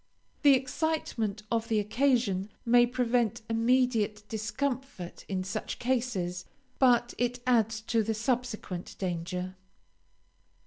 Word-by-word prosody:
The 285 -2 +7
excitement 255 -6 -1
of 230 -1 0
the 220 -2 +2
occasion 215 -3 +1 0.2
may 240 0 +6
prevent 240 -2 0
immediate 230 -2 +2
discomfort 225 -3 -3
in 190 -2 -1
such 205 +3 -4
cases, 230 -9 -1 0.3
but 240 -2 +4
it 245 +1 0
adds 225 -3 +2
to 225 +1 +1
the 220 +1 -1
subsequent 225 -6 -2
danger. 180 +1 -3
230 Hz, 105 wpm, -29 LUFS, 205-250 Hz, 0.3 s, The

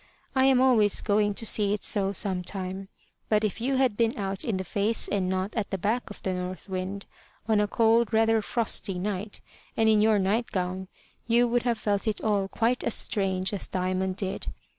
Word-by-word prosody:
I 260 0 +4
am 265 -2 +5
always 235 -6 +4
going 205 -1 +1
to 225 - -2
see 210 -2 +3
it 210 - -9
so 195 -2 +1
some 190 -2 -2
time. 190 +1 -4 0.4
But 215 0 +2
if 215 +1 -2
you 265 +3 0
had 260 -5 +2
been 230 +3 +1
out 195 -1 -2
in 220 -5 -1
the 190 - -3
face 205 +5 0
and 190 -3 -1
not 190 +2 -2
at 215 -3 -2
the 195 - -2
back 225 +7 -1
of 205 - -11
the 190 - -1
North 180 +1 -5
Wind, 190 +1 -4 0.4
on 220 -2 +3
a 210 - +1
cold 230 +2 +3
rather 225 0 +3
frosty 210 -4 -1
night, 200 +2 -4 0.4
and 225 - +3
in 215 -1 +5
your 215 0 +4
night 205 +5 0
gown, 185 0 -3 0.4
you 240 +1 +4
would 240 +1 +1
have 235 - +1
felt 205 0 -1
it 215 - 0
all 205 -3 0
quite 235 +5 0
as 235 - 0
strange 190 -1 -1
as 200 - -3
Diamond 185 0 -1
did. 195 -1 -4
205 Hz, 205 wpm, -27 LUFS, 190-225 Hz, 0.4 s, am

